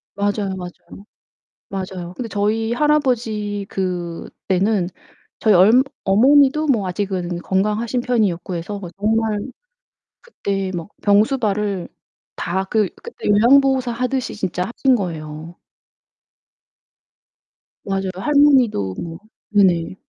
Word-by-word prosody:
맞아요, 200 -1 -1
맞아요. 180 +2 -10 0.6
맞아요. 185 -2 -5
근데 240 -3 -5
저희 220 +3 0
할아버지 235 -9 0
그때는 185 +2 -2 0.5
저희 215 -3 +3
얼 215 +8 +6 0.2
어머니도 275 +8 +4
뭐 225 -9 +1
아직은 180 -2 -3
건강하신 210 +7 -1
편이었고 200 -8 0
해서 200 +5 -5
뭐 180 -3 -8
정말 220 0 +1 0.8
그때 195 - -3
막 170 +3 -6
병수발을 210 -3 +1 0.5
다 190 +3 -2
그 210 -2 +1
그때 - - -5
요양보호사 260 +4 +4
하듯이 250 +2 -2
진짜 180 -3 -2
하신 255 +3 +2
거예요. 160 -3 -6 2.3
맞아요. 195 -1 -2
할머니도 255 - +3
뭐 165 -1 -7 0.3
네네. 185 -4 +2
205 Hz, 240 characters per minute, -20 LUFS, 185-235 Hz, 2.3 s, 얼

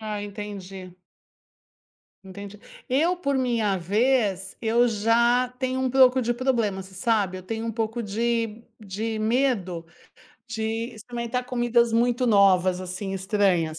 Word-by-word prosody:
Ah, 215 -1 -4
entendi. 195 -3 -8 1.3
Entendi. 200 +2 -10 0.3
Eu, 325 +8 +2
por 280 -5 -1
minha 230 -7 0
vez 200 0 0
eu 235 +2 +3
já 235 +3 +2
tenho 260 0 -1
um 260 - +1
pouco 260 0 +5
de 240 0 0
problema, 235 -6 0
você 190 0 -15
sabe. 195 -2 0
Eu - - -10
tenho 225 +4 -4
um 225 - -2
pouco 225 +1 -2
de 225 +1 -2 0.2
de 215 +2 -4
medo 215 -8 0 0.6
de 225 -2 -5 0.3
experimentar 240 +2 -4
comidas 240 -2 +1
muito 245 +2 +2
novas, 190 -3 +4
assim, 185 +2 -5
estranhas, 190 -5 0
220 Hz, 130 wpm, -25 LUFS, 195-240 Hz, 1.3 s, pouco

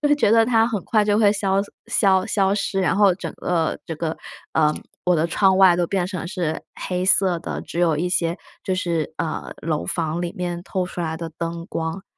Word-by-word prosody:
就 295 - +3
会 295 - +5
觉 290 -8 +2
得 225 0 +5
它 225 -2 +4
很 215 -5 -2
快 215 -2 +2
就 205 0 +2
会 210 -2 +5
消 195 -1 +1 0.3
消 190 -2 +3
消 195 -1 +2
失， 195 -1 -1
然 190 +1 +1
后 200 -3 +5
整 - - -6
个 165 -3 -1
这 165 - -4
个， 160 0 -3 0.4
呃， 155 -1 +3 0.3
我 180 - +3
的 160 +1 +2
窗 190 +3 +3
外 185 -3 +7
都 175 -1 +1
变 190 -1 0
成 180 -3 -5
是 175 -5 -2
黑 180 0 -2
色 185 -2 +3
的， - - -4
只 170 - -4
有 165 -4 +3
一 175 +3 -1
些 170 -1 0 0.3
就 190 - 0
是， 170 -4 -1
呃， 160 -1 -3
楼 155 -2 -1
房 170 -2 -2
里 175 - -3
面 175 -1 -3
透 185 -1 -2
出 180 - -6
来 160 -1 -2
的 165 0 -6
灯 170 0 -4
光。 160 +3 -3
180 Hz, 235 characters per minute, -22 LUFS, 165-195 Hz, 0.4 s, 外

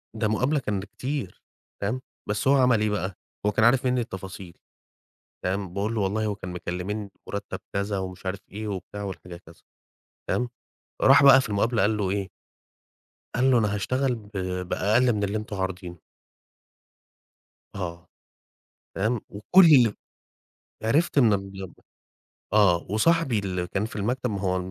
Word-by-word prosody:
ده 110 -1 0
مقابلة 130 +8 +1
كان 105 -7 -2
لكتير، 125 +2 -5 0.4
فاهم؟ 115 +6 -1 0.3
بس 105 +5 -1
هو 140 - +6
عمل 125 -4 +4
إيه 110 - +2
بقى؟ 95 -2 -2 0.3
هو 105 - +3
كان 110 +2 +3
عارف 130 +2 +4
منّي 125 -1 +2
التفاصيل، 95 -4 -8 0.9
فاهم؟ 95 -1 -2
باقول 105 +4 -1
له 110 - 0
والله 105 +3 0
هو 105 -1 -1
كان 95 -2 -8
مكلمينّي 90 +4 -4 0.2
بمُرتّب 100 -2 -5
كذا، 100 0 -1
ومش 95 0 -7
عارف 95 +1 -2
إيه 105 +2 -5
وبتاع 100 +1 -5
والحكاية 90 -3 -7
كذا، 85 -2 -18 0.7
تمام، 125 0 0 0.5
راح - - +7
بقى 135 -1 +9
في 125 - -5
المقابلة 110 +3 +1
قال 105 +1 +2
له 100 -3 0
إيه؟ 100 -1 -2 1.1
قال 130 +2 +3
له: 125 - +5
"أنا 105 -3 +1
هاشتغل 130 +6 0
ب 105 -3 -13 0.4
بأقل 115 +7 +3
من 105 -1 -1
اللي 100 +2 0
أنتم 110 -1 -5
عارضينه." 90 -3 -4 1.7
آه. 85 -3 -5 0.9
تمام، 110 +3 0
وكل 130 - +6 0.9
عرفت 145 +9 +2
إن 115 -6 +6
ال 95 -1 -5 0.8
آه 95 -5 +4
وصاحبي 130 +2 +2
اللي 90 -3 -2
كان 100 +4 -2
في 110 - -6
المكتب 120 +4 -1
ما 100 - -3
هو 95 -1 0
105 Hz, 150 wpm, -26 LUFS, 95-120 Hz, 1.7 s, بقى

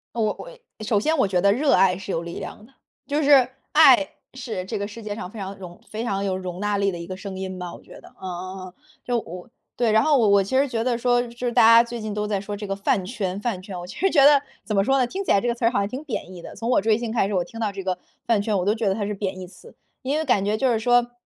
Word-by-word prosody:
我 215 -2 0
我 - - -10 0.3
首 215 -1 +2
先 310 +10 +1
我 235 - +3
觉 185 -2 +1
得 200 +2 +4
热 275 +5 +2
爱 185 -1 +4
是 195 +1 -8
有 165 - -1
力 170 0 -7
量 210 - -8
的。 265 - -26 0.3
就 295 +2 0
是 275 -3 +6 0.2
爱 290 -2 +7 0.3
是 235 -8 -5
这 190 - -4
个 200 - -3
世 220 +2 -10
界 210 -1 -4
上 180 -4 -7
非 220 - -11
常 195 0 -6
容 175 -2 -11
非 220 +2 -4
常 200 -4 -1
有 190 -2 -1
容 185 -1 -6
纳 205 0 0
力 200 -1 +1
的 175 - -6
一 170 - -7
个 185 - -6
声 190 0 -7
音 190 -1 -5
吧 180 -1 -6
我 - - -13
觉 - - -14
得。 - - -15
嗯 - - -11
嗯 185 +1 -6
嗯。 180 - -17 0.3
就 245 -1 0
我 180 -3 -10 0.3
对， 235 -3 +2
然 220 +1 +5
后 300 -3 +4
我 225 -4 +3
我 200 0 +5
其 260 +7 0
实 280 +1 +2
觉 230 -3 -2
得 245 -2 0
说， 245 0 +2
就 235 -1 -9
是 - - +1
大 - - +5
家 230 +1 +8
最 235 0 -6
近 215 -1 -4
都 210 0 -2
在 205 -1 -1
说 205 +1 -6
这 205 0 -6
个 195 0 -3
饭 200 -1 +1
圈 195 -3 -3
饭 210 -5 -3
圈， 185 -1 -7
我 175 - -8
其 180 - -10
实 385 - +2
觉 290 -6 +5
得 285 +1 +8 0.2
怎 215 - -3
么 195 - +3
说 270 +4 +2
呢， 255 - +2
听 385 +10 -5
起 - - -3
来 200 - +5
这 240 - -2
个 235 - +1
词 235 - -5
好 240 - 0
像 200 0 0
挺 260 +7 -6
贬 220 - -5
义 175 - -10
的。 - - -10
从 225 +3 -5
我 250 - +3
追 220 0 +2
星 235 -1 -4
开 225 -3 +1
始， 205 - -4
我 185 -3 +1
听 200 +6 -10
到 215 -3 -1
这 195 0 -6
个 185 -1 -1 0.3
饭 225 -4 +2
圈， 205 -1 0
我 180 - -2
都 210 - +3
觉 225 -1 -2
得 - - +2
它 205 -1 -2
是 210 - -3
贬 190 -2 -4
义 185 - -7
词。 180 0 -16 0.3
因 275 +4 -1
为 315 - -1
感 210 -7 +2
觉 205 +1 0
就 260 +1 +2
是 230 - +2
说， 245 +1 +2
210 Hz, 340 characters per minute, -23 LUFS, 190-245 Hz, 0.3 s, 家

